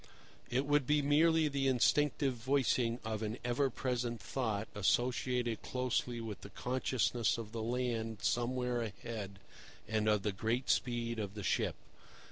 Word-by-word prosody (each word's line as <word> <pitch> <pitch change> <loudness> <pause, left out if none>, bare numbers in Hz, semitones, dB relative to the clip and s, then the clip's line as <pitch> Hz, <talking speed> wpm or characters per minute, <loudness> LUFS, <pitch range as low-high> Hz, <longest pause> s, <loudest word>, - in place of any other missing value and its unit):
It 130 +3 +1
would 145 -2 +2
be 150 -1 +3
merely 160 +2 +4
the 140 -2 0
instinctive 135 +2 +3
voicing 125 -1 +1
of 110 -1 -2
an 110 +2 -2
ever 130 +3 +2
present 120 -2 -2
thought 110 -5 -2
associated 120 +2 +1
closely 125 -1 -1
with 110 -3 -6
the - - -9
consciousness 125 +1 0
of 110 -2 -6
the 115 -1 -4
land 115 -2 -2
somewhere 125 0 0
ahead 105 -2 -5 0.5
and 110 -1 +1
of 105 -2 +2
the 105 - +1
great 115 +6 0
speed 120 -2 0
of 100 -1 -4
the 105 - -5
ship. - - +1
120 Hz, 145 wpm, -34 LUFS, 110-130 Hz, 0.5 s, merely